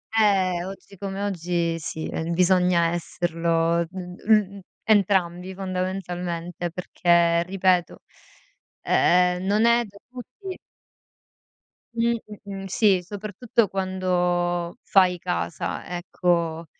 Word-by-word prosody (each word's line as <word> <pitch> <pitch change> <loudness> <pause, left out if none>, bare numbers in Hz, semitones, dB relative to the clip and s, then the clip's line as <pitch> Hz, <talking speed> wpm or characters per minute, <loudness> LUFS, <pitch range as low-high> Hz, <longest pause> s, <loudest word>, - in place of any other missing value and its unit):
Ehm, 190 -5 +3
oggi 195 +1 -10
come 195 +1 -5
oggi 175 -3 -1
sì, 160 0 -5 0.2
bisogna 180 -1 +3
esserlo, 170 -1 0
mhmm, 190 +2 0
l - - -13 0.2
entrambi 190 -4 +2
fondamentalmente, 180 -2 -4
perché 170 -1 +2
ripeto, 180 -1 +1 0.8
ehm 180 0 +3
non 210 +3 +3
è 235 0 +4
da 200 -1 -15
tutti 365 - -9 1.4
Mh. 235 0 +2 0.3
Mh-mh. 195 -1 -6
Sì, 195 -1 +3
soprattutto 210 +4 -1
quando 180 -2 -1
fai 185 -2 +4
casa, 175 -2 -3
ecco, 170 -2 -1
180 Hz, 95 wpm, -24 LUFS, 175-195 Hz, 1.4 s, è